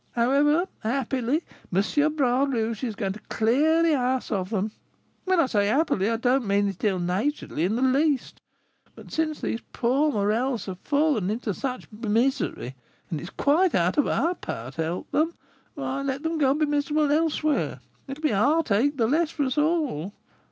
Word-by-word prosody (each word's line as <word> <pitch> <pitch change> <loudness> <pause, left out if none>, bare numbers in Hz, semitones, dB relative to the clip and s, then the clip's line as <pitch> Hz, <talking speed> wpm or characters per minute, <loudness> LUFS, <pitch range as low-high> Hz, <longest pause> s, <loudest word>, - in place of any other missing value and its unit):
However, 285 +8 +3
happily, 260 +5 -1 0.3
M. 290 - +1
Bras 265 -1 +2
Rouge 230 -2 -2
is 230 -4 -2
going 195 -1 -2
to 215 - -10
clear 300 +9 +3
the 325 -2 +3
house 255 -1 -1
of 190 -3 -1
them, 210 0 -1 0.5
when 375 -2 +2
I 330 - +5
say 205 -5 +1
happily, 220 - +1
I 230 - 0
don't 245 0 +1
mean 200 +1 +2
it 195 -2 -6
ill 200 -3 +2
naturedly 180 - -1
in 205 +5 0
the 250 - 0
least; 275 +1 +1 0.5
but - - -13
since 315 -1 -1
these 230 - -2
poor 270 +5 +2
Morels 225 +3 0
have 190 -2 -6
fallen 285 - +1
into 215 -1 -2
such 255 +4 -4
misery, 230 - -1 0.4
and 160 - -2
it - - -9
is - - -8
quite 320 - +2
out 180 - +2
of 290 - +3
our 340 +2 +1
power 125 - -6
to 165 - -4
help 170 +3 -4
them, 320 +2 +1 0.4
why 275 -1 -3
let 275 +1 -3
them 325 0 -1
go 275 -3 +4
and 280 +3 +1
be - - +5
miserable 295 0 +1
elsewhere; 310 -1 +1 0.3
it 270 0 -6
will 305 - -15
be 305 - +2
a 195 - +1
heartache 285 -1 +2
the 230 - +2
less 310 +7 +2
for 305 -3 -2
us 260 0 -1
all." 295 - 0
260 Hz, 190 wpm, -25 LUFS, 210-295 Hz, 0.5 s, I